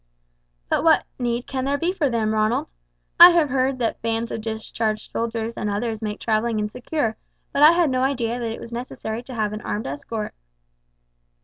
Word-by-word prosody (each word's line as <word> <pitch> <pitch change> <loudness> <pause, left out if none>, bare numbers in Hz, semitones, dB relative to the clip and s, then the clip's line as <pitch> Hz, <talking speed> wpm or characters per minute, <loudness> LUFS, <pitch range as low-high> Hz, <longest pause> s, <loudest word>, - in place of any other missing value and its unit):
"But - - +1
what 325 -1 +5 0.2
need 240 0 -1
can 260 -1 -3
there 280 +1 +1
be 340 +5 0
for 305 -7 +1
them, 220 -2 0
Ronald? 215 - 0 0.5
I 345 - +13
have 335 -4 +3
heard 260 0 +1
that 235 -3 -2
bands 230 0 -2
of 225 - -4
discharged 220 0 -3
soldiers 230 0 -3
and 210 - -2
others 220 +2 -2
make 210 -1 -4
travelling 225 0 0
insecure; 225 +2 -2 0.4
but 280 - +1
I 305 +3 +9
had 340 -5 +2
no 255 0 +1
idea 245 -3 0
that 230 -2 -2
it 225 - -6
was 235 - -9
necessary 235 -2 -5
to 250 +1 -9
have 215 -2 -1
an 215 - -5
armed 210 - -3
escort." 210 +11 -5
230 Hz, 190 wpm, -23 LUFS, 220-260 Hz, 0.5 s, I